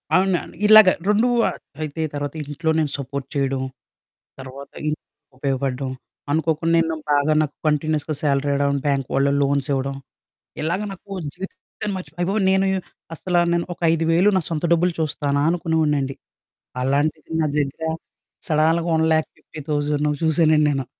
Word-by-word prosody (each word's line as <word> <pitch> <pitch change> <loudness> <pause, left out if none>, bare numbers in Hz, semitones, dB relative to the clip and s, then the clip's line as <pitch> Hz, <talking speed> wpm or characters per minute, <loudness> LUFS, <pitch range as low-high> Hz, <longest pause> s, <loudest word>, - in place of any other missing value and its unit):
అవునండి. 185 -3 +1
ఇలాగ 215 -2 +9 0.2
2 220 +4 +3 0.2
ఆహ్, - - -7 0.2
అయితే 155 +1 -4
తర్వాత 145 -1 -3
ఇంట్లో 150 +3 -2
నేను 150 -3 0
సపోర్ట్ 140 0 -5
చేయడం, 135 -1 0 0.8
తర్వాత 135 +1 -9 0.2
ఇన్ 150 - 0 0.4
ఉపయోగపడడం, 135 -1 -2 0.4
అనుకోకుండా 160 +1 +1
నేను 165 -1 0 0.2
బాగా 145 +1 +3
నాకు 150 -1 -2
కంటిన్యూయస్‌గా 155 0 0
సాలరీ 140 0 +1
రావడం, 140 0 +1
బ్యాంక్ 140 -3 0
వాళ్ళు 140 +1 +3
లోన్స్ 140 -1 +1
ఇవ్వడం, 135 0 -1 0.7
ఇలాగ 170 +6 0
నాకు 195 +1 -12 0.2
జీవితాన్ని 195 +1 -7
మర్చిపో 160 -2 -10
అయ్య 175 - +1
బాబోయి! 200 0 +1
నేను 190 0 +3 0.5
అసల 175 +2 -1 0.2
నేను 170 0 0
ఒక - - -22
5,000 165 +4 +3
నా - - +1
సొంత 160 -2 -3
డబ్బులు 175 +1 +2
చూస్తానా 145 -2 0
అనుకునేవాడినండి. 155 -5 0 0.7
అలాంటిది 145 +4 0
నా 155 - +2
దగ్గర 145 +2 -2 0.6
సడాల్‌గ 160 +2 +2
1,50,000 150 -2 -1 0.2
చూసానండి 155 -1 +4
నేను. 135 -2 -2
150 Hz, 135 wpm, -22 LUFS, 140-165 Hz, 0.8 s, ఇలాగ